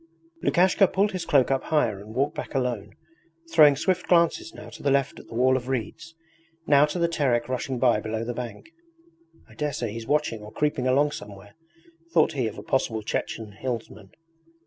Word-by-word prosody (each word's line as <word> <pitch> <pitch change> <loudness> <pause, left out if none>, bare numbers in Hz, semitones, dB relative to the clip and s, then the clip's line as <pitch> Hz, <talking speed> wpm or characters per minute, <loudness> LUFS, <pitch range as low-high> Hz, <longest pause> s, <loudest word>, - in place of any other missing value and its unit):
Lukashka 185 +2 +4
pulled 200 +3 +1
his 185 -3 -4
cloak 135 -2 +3
up 135 - 0
higher 120 -11 +1
and 105 +2 -11
walked 140 +3 +1
back - - -7
alone, 120 -7 -2 0.6
throwing 150 -3 +7
swift 185 +5 -1
glances 180 - +2
now 340 - -11
to - - -12
the 140 - +1
left 140 0 +1
at - - -14
the - - -10
wall 130 +2 +3
of 125 -1 -3
reeds, 135 +6 -4 0.5
now 145 0 +5
to 150 - -4
the 170 -1 +2
Terek 130 -8 0
rushing 130 +1 -3
by 120 -3 +3
below 110 +1 -3
the 120 +1 -3
bank. 125 - -7 0.8
'I - - -17
daresay 145 -7 -3
he's 115 +1 -7
watching 145 -7 0
or 105 0 -10
creeping 145 -2 -1
along 145 +3 +3
somewhere,' 100 -5 -10 0.6
thought 160 -1 +4
he 130 -5 -1
of 110 - -7
a - - -8
possible 110 -4 -1
Chechen 110 0 -4
hillsman. 110 -3 -6
130 Hz, 190 wpm, -25 LUFS, 115-150 Hz, 0.8 s, throwing